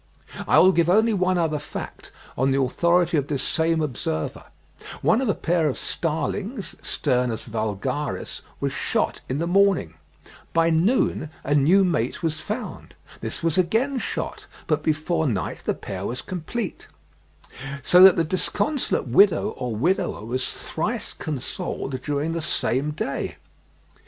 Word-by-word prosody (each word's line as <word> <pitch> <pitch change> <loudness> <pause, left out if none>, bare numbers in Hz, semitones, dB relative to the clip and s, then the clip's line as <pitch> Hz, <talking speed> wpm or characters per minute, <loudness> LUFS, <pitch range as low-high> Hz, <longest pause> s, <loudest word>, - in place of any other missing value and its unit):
I - - +5
will 185 +2 +7
give 170 -2 +2
only 220 +4 +4
one 185 -2 +2
other 160 -3 0
fact, 150 - -8 0.2
on 130 +2 +2
the 135 0 +2
authority 170 +5 +2
of 140 -1 0
this 140 -2 -2
same 160 0 +1
observer; 80 - -3 0.6
one 225 - +4
of 260 - 0
a 200 - +2
pair 170 -2 +1
of 130 - -3
starlings 185 - -3
(Sturnus 125 -5 0
vulgaris) 115 +6 -3 0.2
was - - -1
shot - - -1
in 130 - -1
the 165 - -1
morning; 190 - +3 0.6
by 165 0 +3
noon 165 - +2
a 145 - 0
new 160 +8 +5
mate 160 -6 -1
was 155 -1 -1
found; 220 +4 -6 0.2
this - - -5
was 165 +2 +2
again 230 +10 +1
shot, - - -4 0.2
but 155 -1 +1
before 155 +1 0
night 95 - -2
the - - 0
pair 95 -1 -6
was 125 +5 -4
complete; 185 +4 -5 1.0
so 180 +5 +6
that 190 -1 +10
the 165 - +2
disconsolate 205 - 0
widow 165 - +4
or 125 -3 -4
widower 130 - 0
was 130 +3 -2
thrice - - -3
consoled 135 -2 -4
during 145 +3 -1
the 165 0 -2
same 140 -2 0
day. 150 -2 -3
160 Hz, 145 wpm, -24 LUFS, 135-185 Hz, 1.0 s, that